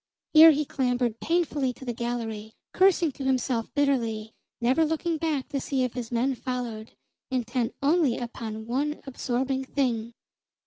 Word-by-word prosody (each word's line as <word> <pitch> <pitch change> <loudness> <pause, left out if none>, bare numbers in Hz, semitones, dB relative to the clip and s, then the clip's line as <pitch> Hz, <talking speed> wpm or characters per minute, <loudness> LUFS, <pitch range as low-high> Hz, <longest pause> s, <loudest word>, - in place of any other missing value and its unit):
Here 320 +1 +10
he 300 -1 +2
clambered 245 -4 0
painfully 300 -6 0
to 265 - -12
the 240 - -2
gallery, 225 -2 -4 0.2
cursing 370 -4 +4
to 275 - -8
himself 255 -3 0
bitterly, 230 -7 0 0.3
never 255 +7 +3
looking 320 +1 -1
back 300 -5 -1
to 275 - -2
see 265 -1 0
if 250 - -2
his 245 -2 -5
men 245 +3 +1
followed, 240 -3 -5 0.4
intent 250 -2 -1
only 290 -4 +3
upon 225 -2 -6
one 285 +6 -1
absorbing 265 0 -2
thing. 240 -4 -1
255 Hz, 145 wpm, -27 LUFS, 235-285 Hz, 0.4 s, Here